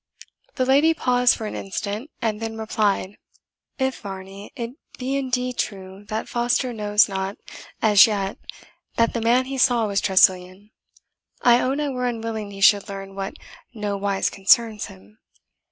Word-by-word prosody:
The 255 - 0
lady 290 +5 +4
paused 250 -3 +3
for 220 - -6
an 210 - -5
instant, 205 +6 -5
and 220 -1 -1
then 225 0 -4
replied, 210 -3 -1 0.6
"If, 265 -1 -1
Varney, 195 0 -9
it 235 -3 -5 0.3
be 265 +2 -2
indeed 250 -2 -2
true 195 0 -5
that 215 +1 -4
Foster 245 +1 0
knows 210 -1 +3
not 195 0 -4 0.5
as 210 -1 +7
yet 200 -2 -3 0.6
that 230 0 +2
the 235 - -2
man 240 +3 +3
he 270 0 -5
saw 245 -3 +3
was 200 -1 0
Tressilian, 190 +1 +2 0.7
I 240 0 +6
own 270 +3 -1
I 295 -1 -1
were 250 -2 -2
unwilling 225 -3 -4
he 195 -1 -10
should 205 +1 +5
learn 195 0 -7
what 195 0 -5 0.4
nowise 200 -2 -1
concerns 210 +2 +2
him. 100 +3 -17
215 Hz, 155 wpm, -23 LUFS, 195-245 Hz, 0.7 s, as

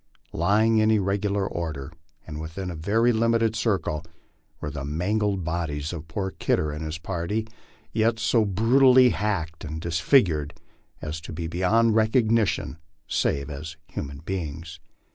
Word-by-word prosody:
Lying 110 +6 +3
in 110 0 +3
irregular 100 -1 +1
order, 80 -4 -5 0.3
and 75 -1 -6
within 90 +4 -5
a - - -6
very 110 +9 +2
limited 115 0 +2
circle, 95 -9 0 0.6
were 75 - -4
the 70 -1 -5
mangled 95 +6 0
bodies 80 -2 -3
of 80 -2 -7
poor 95 +4 -3
Kidder 75 -4 0
and 75 +2 -5
his 80 0 -4
party, 90 +6 -3 0.5
yet 115 +1 +2
so 115 0 +2
brutally 125 +5 +5
hacked 90 -7 -2
and 80 0 -5
dis 85 0 -2
figured 80 - +3 0.5
as 75 +1 -4
to - - -9
be 85 +1 -4
beyond 100 +7 +2
recognition 110 -5 +2 0.3
save 70 0 0
as 80 +3 -7
human 70 0 -5
beings. 80 -3 -5
90 Hz, 145 wpm, -25 LUFS, 80-110 Hz, 0.6 s, brutally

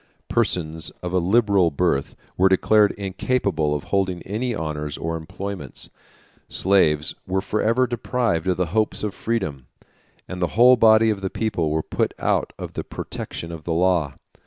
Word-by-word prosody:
Persons 80 -2 0
of 90 0 -4
a 90 - +3
liberal 100 -1 +3
birth 75 -2 0 0.2
were 95 +1 +4
declared 105 +2 +4
incapable 95 -6 -1
of 75 - -4
holding 95 -3 -1
any 115 +4 -2
honors 75 -3 -4
or 85 0 -3
employments; 80 -1 -7 0.6
slaves 80 -5 +2
were 95 +1 0
forever 115 +5 +1
deprived 120 -8 -1
of 90 - +1
the 90 - +1
hopes 110 -1 0
of 105 -2 -2
freedom, 80 - -3 0.6
and 90 -1 -6
the 90 - -2
whole 125 +2 +8
body 110 -1 +5
of 100 -2 -4
the 95 - -2
people 100 -9 -1
were 80 +1 0
put - - -1
out - - 0
of - - -7
the - - -4
protection 85 - -7
of 80 -2 -8
the 85 - -2
law. 85 -5 +1
95 Hz, 160 wpm, -23 LUFS, 80-105 Hz, 0.6 s, whole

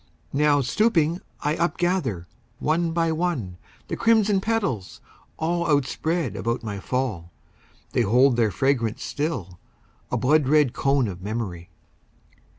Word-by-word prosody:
Now, 145 0 +3
stooping, 170 - +2 0.2
I 150 +1 0
upgather, 170 - 0 0.3
one 165 +4 0
by 165 0 +1
one, 155 - -2 0.3
The - - -3
crimson 215 -4 +3
petals, 195 - -2 0.4
all 170 +1 0
Outspread 145 - 0
about 115 +3 -2
my 105 -3 -4
fall. 105 -8 -3 0.6
They - - +1
hold 125 +4 +4
their 115 -2 +2
fragrance 115 +1 0
still, 115 - -3 0.5
a - - +1
blood 145 +1 +3
red 150 -3 +4
cone 135 -3 +1
Of 90 -3 -7
memory. 100 -4 -4
140 Hz, 125 wpm, -24 LUFS, 110-165 Hz, 0.6 s, hold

